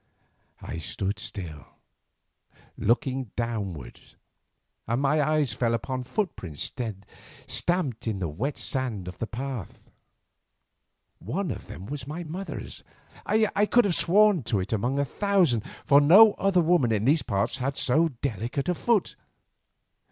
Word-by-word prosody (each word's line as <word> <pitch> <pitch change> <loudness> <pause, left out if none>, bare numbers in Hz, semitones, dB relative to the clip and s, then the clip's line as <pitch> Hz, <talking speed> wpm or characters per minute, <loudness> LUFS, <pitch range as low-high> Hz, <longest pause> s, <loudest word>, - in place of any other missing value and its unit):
I 80 - -5
stood 100 +5 -3
still, 85 -9 -6 1.1
looking 130 +1 0
downward, 100 - -4 0.9
and 115 +3 0
my 145 +2 +2
eyes 150 -5 +1
fell 115 +2 +1
upon 130 +2 -4
footprints 110 - -3 0.7
stamped 160 -11 -1
in 110 -3 -1
the 90 -3 -2
wet 110 - -3
sand 120 -9 -2
of 90 - -8
the 115 - -2
path. 125 -2 -6 1.4
One 165 - -3
of - - -7
them 95 - -9
was 135 +1 -6
my 160 +4 -5
mother's. 175 +5 -6 0.4
I 210 -1 +2
could 245 0 +4
have 195 - +1
sworn 185 +2 +4
to 105 - 0
it 95 +4 -3
among 120 +6 0
a 140 - +2
thousand, 175 - +2 0.2
for 140 +1 +6
no 200 +9 +8
other 190 -2 +2
woman 160 -8 +3
in 110 0 0
these 150 +3 +4
parts 100 -4 -1
had 135 +2 -2
so 150 +5 +3 0.2
delicate 125 - -2
a - - +3
foot. 225 +3 +1
135 Hz, 135 wpm, -26 LUFS, 110-170 Hz, 1.4 s, no